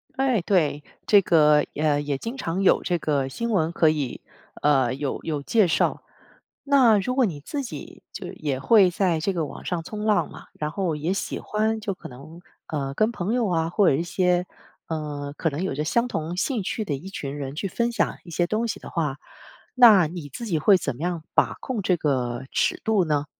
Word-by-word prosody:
哎， 260 -6 +1
对， 155 -6 +1 0.2
这 205 -2 +6
个， 150 -4 +4
呃 150 -1 +1
也 145 -2 -2
经 230 - -6
常 190 -5 -2
有 - - +4
这 175 - 0
个 145 -4 0
新 235 - -3
闻， 165 -5 +1
可 165 - +3
以 145 -5 -2 0.4
呃 135 -4 +3
有 140 -1 -3
有 150 -3 -3
介 215 +3 +3
绍。 - - 0 0.6
那 260 -7 +5
如 250 +6 -1
果 260 -1 +3
你 160 -8 -3
自 280 - -4
己 250 - -9
就 - - -7
也 145 -4 -3
会 195 - +5
在 175 -3 0
这 195 - 0
个 170 -4 -1
网 - - -10
上 175 -2 -2
冲 210 -1 -6
浪 215 -1 +2
嘛， - - -12
然 150 0 -2
后 170 -3 -1
也 155 +5 -1
喜 195 - -3
欢， 220 +1 -1
就 205 -2 -3
可 - - -10
能， 145 +7 -12 0.3
呃 140 -3 -3
跟 215 +7 +1
朋 195 -1 -2
友 240 -4 +1
啊， 165 -2 0
或 200 +1 +3
者 - - +4
一 160 - 0
些， 180 0 +1 0.4
呃 150 -3 -4
可 160 - 0
能 145 +5 -4
有 190 - -1
着 150 - -2
相 235 +9 +1
同 165 -3 -3
兴 230 +3 -1
趣 220 - -2
的 150 -8 -2
一 165 +8 -7
群 145 -6 -5
人 135 -1 -5
去 195 +6 -3
分 235 +5 -1
享 - - 0
一 170 - -11
些 175 +2 0
东 220 +3 0
西 225 - -4
的 - - -10
话， 150 -5 -2 0.6
那 215 -10 +7
你 165 -3 -7
自 235 - -7
己 170 -7 0
会 200 +5 +5
怎 140 -8 -3
么 150 - -9
样 175 -2 -2
把 - - +3
控 250 -5 -3
这 180 -1 +2
个 130 -6 -1
尺 370 -1 0
度 215 -5 +2
呢？ 150 -2 0
175 Hz, 235 characters per minute, -24 LUFS, 150-210 Hz, 0.6 s, 那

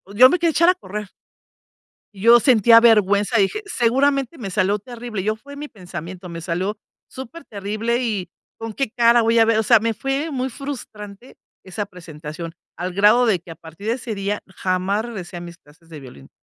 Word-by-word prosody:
yo 255 +4 +8
me 360 - +1
quería 335 -1 +2
echar 335 +2 +3
a 365 - +4
correr 210 - -7 1.0
y 195 - -11
yo 235 +2 +7
sentía 230 -2 +6
vergüenza, 210 -1 +3
dije: 205 - +1
"Seguramente, 275 - +1
me 200 -6 -6
salió 200 +2 +1
terrible". 235 -2 -6
Yo 215 +2 -1
fue 285 +5 -13
mi 295 +1 -7
pensamiento, 180 - -9
me 170 -1 -7
salió 185 +6 -3 0.3
superterrible, 230 -4 -4
y 210 -6 -3 0.3
con 225 -1 -6
qué 270 +1 -2
cara 235 0 +4
voy 230 +1 +3
a 225 - +6
ver 225 -1 +2
o 220 - +2
sea, 230 +2 +5
me 225 +1 -1
fue 275 +6 -2
muy 260 -2 -2
frustrante 235 -5 -9 0.3
esa 200 +2 -5
presentación, 165 -2 -9 0.2
al 180 +1 -3
grado 210 +6 +4
de 210 -5 +2
que 170 - -15
a - - -7
partir 165 +5 -12
de 230 - +2
ese 245 -3 -5
día, 200 +1 -3
jamás 190 +2 -1
regresé 195 -7 -7
a - - -6
mis 170 0 -10
clases 155 +3 -23
de 155 -2 -9
violín. 125 - -13
215 Hz, 195 wpm, -21 LUFS, 185-240 Hz, 1.0 s, yo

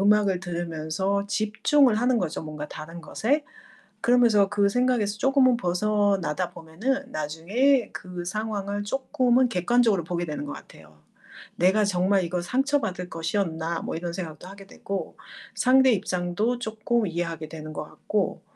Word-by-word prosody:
음악을 200 -2 +3
들으면서 175 +3 -2
집중을 220 +5 +3
하는 245 +1 +2
거죠, 170 -5 -3
뭔가 150 -1 -6
다른 165 +3 -8
것에. 270 - 0 0.6
그러면서 230 -4 +4
그 200 -1 +2
생각에서 240 -3 +1
쪼금은 265 -2 +4
벗어나다 190 -4 0
보면은 255 +12 -3
나중에 200 - +1
그 180 -1 -7
상황을 205 +1 -3
쪼끔은 255 +1 +2
객관적으로 205 0 +2
보게 175 +1 -2
되는 150 -2 -5
것 145 - -5
같아요. 75 0 -14 0.6
'내가 190 +5 +4
정말 190 0 +2
이거 175 +1 -2
상처받을 220 -5 -1
것이었나.' 165 -1 -2
뭐 - - -4
이런 170 0 -4
생각도 170 -2 -6
하게 195 0 -12
되고 195 -1 -6 0.4
상대 260 0 +5
입장도 205 +4 -1
쪼끔 220 0 -1
이해하게 165 -2 -4
되는 155 -1 -8
것 150 - -4
같고 200 +5 -2
200 Hz, 330 characters per minute, -25 LUFS, 170-230 Hz, 0.6 s, 상대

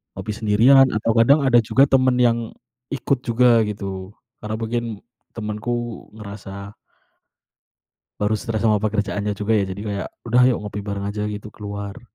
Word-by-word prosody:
Ngopi 105 - -5
sendirian 120 +6 +5
atau 110 +1 0
kadang 130 +6 +5
ada 120 -2 +6
juga 135 +5 +4
temen 130 -1 +3
yang 120 -1 +4 0.5
ikut 140 -2 -1
juga 120 -1 +4
gitu. 100 -2 -5 0.3
Karena 110 0 -3
mungkin 115 -1 -3 0.3
temenku 105 +1 -4 0.5
ngerasa 100 -1 -9 1.4
baru 105 +1 +1
stres 110 0 -3
sama 105 -1 +3
pekerjaannya 105 -1 -1
juga 105 +2 0
ya - - +1
jadi 95 +2 -6
kayak, 100 -2 -3 0.2
"Udah 120 +2 +3
ayok 125 - +1
ngopi 105 0 -5
bareng 100 0 -3
aja 105 +1 -3
gitu, 105 0 -6
keluar." 100 +2 -7
110 Hz, 150 wpm, -21 LUFS, 105-120 Hz, 1.4 s, ada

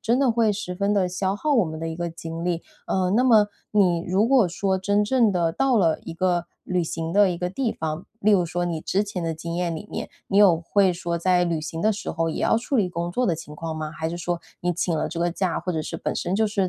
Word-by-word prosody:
真 235 +3 +1
的 270 -3 +3
会 225 -1 +3
十 195 -3 -4
分 200 +2 0
的 190 -2 +2
消 190 +2 -1
耗 300 +6 0
我 230 -8 +4
们 160 0 -6
的 165 - -4
一 160 - -4
个 170 0 -3
精 165 0 -7
力。 170 -1 -1 0.2
呃， 185 -1 +1
那 230 +5 +3
么 220 -5 +5 0.2
你 180 -5 +3
如 195 +5 +3
果 250 -8 +4
说 190 +2 0
真 205 +2 +1
正 235 -2 +3
地 170 -3 +1
到 260 +4 +2
了 165 -6 +3
一 165 - -6
个 175 -1 +1 0.2
旅 180 -1 0
行 165 +1 -4
的 205 -1 +5
一 175 - -2
个 180 +1 -2
地 240 +3 -1
方， 160 +3 -4
例 215 - +3
如 180 -4 +4
说 175 +1 -2
你 165 -2 -2
之 195 +5 0
前 200 -3 -5
的 165 -1 -2
经 170 +1 -5
验 175 -2 -1
里 205 +6 -7
面， - - -4 0.2
你 200 - +2
有 180 -5 +6
会 190 +2 +2
说 170 -1 -3
在 180 +1 +3
旅 165 -2 -1
行 160 +1 -5
的 215 +1 +3
时 205 - -6
候 165 0 -1
也 - - -4
要 - - +3
处 250 +4 -1
理 195 -5 +2
工 170 0 -3
作 250 +6 0
的 170 - +2
情 155 -2 -9
况 165 0 -4
吗？ 155 -1 -4
还 160 0 -3
是 170 - -4
说 175 0 -2 0.2
你 175 0 0
请 170 -1 -1
了 - - -1
这 170 - -5
个 175 +1 +1
假， 185 -1 -1
或 180 - -3
者 155 -1 -2
是 - - -5
本 - - -3
身 180 - -2
就 220 0 +3
是 200 -3 0
180 Hz, 300 characters per minute, -24 LUFS, 165-205 Hz, 0.2 s, 有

